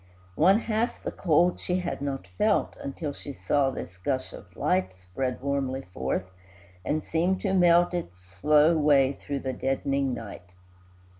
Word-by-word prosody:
One 190 - +4
half 225 +1 -1
the - - -3
cold 175 +1 +2
she 180 - -1
had 175 -5 -4
not 140 -1 -3
felt, - - +2
Until 145 +1 -5
she 140 0 -8
saw 140 0 +1
this 90 -8 -7
gush 130 +7 -2
of - - -13
light 95 0 0
Spread 120 +8 -3
warmly 135 -1 -1
forth, 65 +7 -2 0.6
and 155 +1 -1
seem 175 +4 +1
to 195 -2 0
melt 175 -1 +5
Its 125 - -4
slow 150 - +3
way 140 -3 +4
through 140 -1 -5
the 130 -1 -3
deadening 135 0 -1
night. 100 -6 -9
140 Hz, 155 wpm, -27 LUFS, 130-170 Hz, 0.6 s, melt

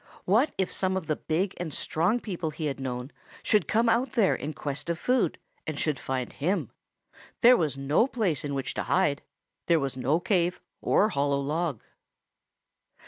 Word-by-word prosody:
What 225 +11 +3
if 190 -1 0
some 190 0 0
of 185 - -4
the 155 - 0
big 175 +6 -1
and 175 -3 -4
strong 175 - +1
people 180 -8 -3
he 155 +1 -5
had 140 -2 -2
known 125 0 -4 0.3
should 210 - +2
come 230 +2 +2
out 235 +4 +2
there 225 -7 +4
in 150 - -4
quest 150 +1 -4
of 170 - 0
food 250 -4 +1 0.3
and 155 -2 -3
should 150 -3 0
find 130 -2 -3
him? 180 +8 -1 0.7
There 250 +1 +8
was 150 - 0
no 140 - +2
place 215 - -1
in 145 -1 -3
which 135 - -3
to - - -2
hide. 145 -1 +2 0.5
There 170 -2 +4
was 135 -2 -2
no 130 +6 +1
cave 175 -1 +1 0.2
or 210 - +3
hollow 140 -4 +1
log. 150 -2 -2
160 Hz, 180 wpm, -27 LUFS, 140-195 Hz, 0.7 s, There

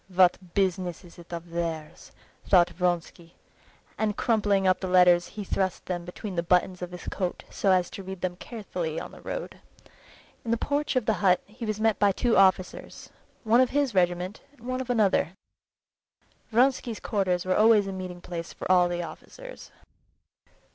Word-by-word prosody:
"What 180 -1 +2
business 185 -2 0
is 175 -1 -15
it 175 - -14
of 170 0 -7
theirs!" 165 -2 -5 0.4
thought 175 -2 +5
Vronsky, 175 -1 -3 0.6
and 210 -1 0
crumpling 205 -4 +2
up 185 - +3
the 190 - -4
letters 180 -1 +5
he 210 - -3
thrust 190 -1 -2
them 175 -2 -4
between 185 +2 -7
the 170 - +1
buttons 180 +1 +1
of 180 - -4
his 180 0 -9
coat 180 -3 -3
so 195 - +1
as 180 -1 +2
to - - -7
read 190 -1 -8
them 180 -1 -2
carefully 180 -7 -5
on - - -8
the - - -14
road. - - -6 0.8
In 230 - -6
the 230 - +2
porch 290 +3 -1
of 255 -4 +1
the 220 - +2
hut 185 -2 +4
he 225 +2 -8
was 215 0 -2
met 220 -2 +2
by 205 -1 +4
two 230 +4 +1
officers; 190 -1 +1 0.3
one 230 +2 +5
of 255 - +3
his 280 -4 0
regiment 180 +1 0
and 275 - -24
one 255 +2 -3
of 255 - -7
another. 210 -7 +2 1.2
Vronsky's 245 -1 +2
quarters 185 -4 -1
were 185 - +1
always 215 -1 +5
a 195 - -4
meeting 185 -2 -7
place 170 -2 -6
for - - -3
all 180 -1 +5
the 175 0 -2
officers. - - -10
185 Hz, 180 wpm, -27 LUFS, 175-220 Hz, 1.2 s, thought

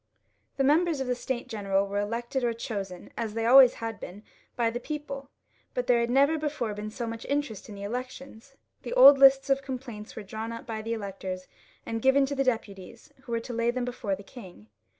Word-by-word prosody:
The 270 - +2
members 315 +2 +3
of 265 - -1
the 250 - 0
States 250 0 -4
General 200 -4 0
were 200 +1 -2
elected 235 +5 -2
or 235 -1 +1
chosen 200 -6 -6
as 225 -2 -4
they 225 - -1
had 230 - +2
always 260 -2 +9 0.2
been 200 +4 -9 0.3
by 235 -2 +1
the 240 - -4
people, 280 -1 -6 0.5
but 250 - -1
there 245 -1 +4
had 235 0 0
never 280 +5 +3
before 295 -8 -2
been 210 +1 -5
so 235 +2 -5
much 230 0 -6
interest 280 -8 -3
in 205 - -8
the 200 - -8
elections. 255 +3 -7 0.3
The - - -5
old 285 - +9
lists 270 0 +6
of 275 0 +3
complaints 250 -5 -7
were 220 - -6
drawn 220 +3 -6
up 230 - -7
by 220 -2 -4
the 225 +1 -3
electors, 190 -3 -5 0.4
and 225 0 -3
given 265 +2 +4
to 275 - -4
the 275 -1 +1
deputies, 220 +2 -4
who 245 - -11
were 230 - +1
to 240 - -7
lay 235 0 +1
them 245 0 -1
before 240 -5 -3
the 200 - -12
king. 185 - -13
235 Hz, 215 wpm, -28 LUFS, 215-270 Hz, 0.5 s, always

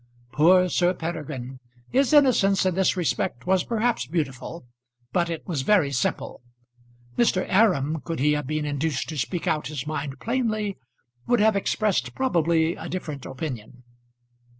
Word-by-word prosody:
Poor 180 +5 +5
Sir 180 +1 +1
Peregrine! 150 -6 -5 0.3
His 270 +1 +2
innocence 240 -10 +4
in 185 - +2
this 190 +1 +1
respect 150 -7 -1
was 185 -1 +2
perhaps 230 - 0
beautiful, 150 0 -4 0.5
but 175 -1 +1
it 165 -2 -5
was 160 -7 -1
very 155 -1 +3
simple. 125 -1 -2 0.8
Mr. 210 -6 +3
Aram, 165 -8 +2
could 165 - -4
he 150 +3 +3
have 150 -2 -1
been 155 +1 -2
induced 145 -1 -2
to 155 - -5
speak 170 +6 -2
out 155 -1 0
his 145 -2 -5
mind 145 -3 -4
plainly, 220 -4 -1 0.5
would 245 -1 +3
have 215 0 +4
expressed, 205 0 0
probably, 170 -9 +2
a - - -8
different 155 -7 -5
opinion. 130 -3 -7
165 Hz, 150 wpm, -25 LUFS, 145-195 Hz, 0.8 s, Poor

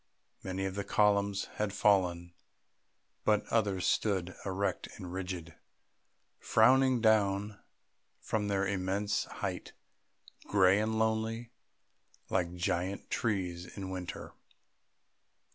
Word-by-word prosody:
Many 95 0 -3
of 95 - -2
the 100 +1 -3
columns 100 -1 +2
had 105 -2 -1
fallen, 90 -5 +2 0.9
but 105 -1 +2
others 100 -5 +1
stood, 95 -4 0
erect 95 0 -1
and 90 -1 -7
rigid, 90 -3 -5 0.9
frowning 130 +2 +4
down 105 -2 +2 0.6
from 105 -2 -2
their 100 -1 +1
immense 100 +1 -1
height, - - -5 0.7
grey 95 0 +5
and 110 0 -1
lonely, 110 +1 -1 0.8
like 90 -2 0
giant 90 +2 -2
trees 90 -5 -1
in 95 -1 -5
winter. 90 -1 -6
100 Hz, 100 wpm, -32 LUFS, 95-105 Hz, 0.9 s, grey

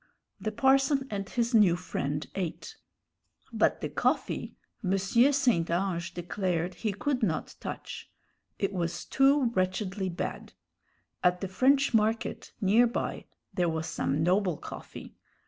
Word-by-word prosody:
The 215 - -2
parson 270 +3 +3
and 200 -2 -3
his 235 0 -1
new 205 -6 +6
friend 145 -4 -3
ate. 190 - -4 0.8
But - - +2
the - - -2
coffee - - -1 0.3
M. 190 0 +2
St. 235 - +3
Ange 170 -1 -1
declared 175 0 -2
he 215 +2 -2
could 255 +6 -1
not 170 -8 -1
touch: - - -7 0.5
it 195 0 -1
was 175 -2 -2
too 270 -2 +3
wretchedly 190 0 -1
bad. 175 - -5 0.7
At 180 0 +3
the 195 - -2
French 270 +8 +3
Market, 225 +1 0
near 215 +5 +5
by, 235 - -3 0.3
there 175 -2 +1
was 160 0 -2
some 150 0 -1
noble 180 -1 +2
coffee. - - -9
195 Hz, 130 wpm, -29 LUFS, 180-235 Hz, 0.8 s, new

